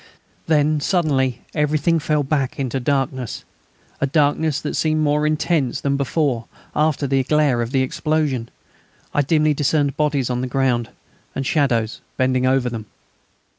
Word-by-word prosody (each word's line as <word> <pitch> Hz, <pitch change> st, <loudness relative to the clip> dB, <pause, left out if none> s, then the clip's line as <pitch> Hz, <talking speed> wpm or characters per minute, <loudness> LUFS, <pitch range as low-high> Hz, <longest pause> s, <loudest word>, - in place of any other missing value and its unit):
Then, 155 Hz, -1 st, +3 dB
suddenly, 145 Hz, -7 st, +1 dB
everything 155 Hz, +2 st, +1 dB
fell 150 Hz, -1 st, 0 dB
back 135 Hz, -2 st, -1 dB
into 135 Hz, 0 st, -1 dB
darkness, 130 Hz, -2 st, -2 dB, 0.6 s
a 140 Hz, -, +1 dB
darkness 150 Hz, +1 st, +1 dB
that -, -, -4 dB
seemed 155 Hz, -1 st, +1 dB
more 150 Hz, 0 st, +2 dB
intense 155 Hz, -4 st, 0 dB
than 140 Hz, 0 st, 0 dB
before 140 Hz, -3 st, 0 dB, 0.3 s
after 150 Hz, -1 st, +1 dB
the 135 Hz, 0 st, +2 dB
glare 140 Hz, -3 st, +2 dB
of 115 Hz, -, -2 dB
the 135 Hz, 0 st, +1 dB
explosion. 145 Hz, -4 st, -1 dB, 0.6 s
I 145 Hz, -, +3 dB
dimly 155 Hz, +1 st, +2 dB
discerned 145 Hz, 0 st, +1 dB
bodies 145 Hz, -4 st, +1 dB
on 125 Hz, 0 st, -1 dB
the 130 Hz, -, -2 dB
ground, 125 Hz, -3 st, 0 dB, 0.5 s
and 135 Hz, -, -2 dB
shadows 120 Hz, -7 st, 0 dB, 0.2 s
bending 130 Hz, 0 st, +2 dB
over 130 Hz, -1 st, +2 dB
them. 115 Hz, -3 st, -5 dB
140 Hz, 145 wpm, -21 LUFS, 130-150 Hz, 0.6 s, Then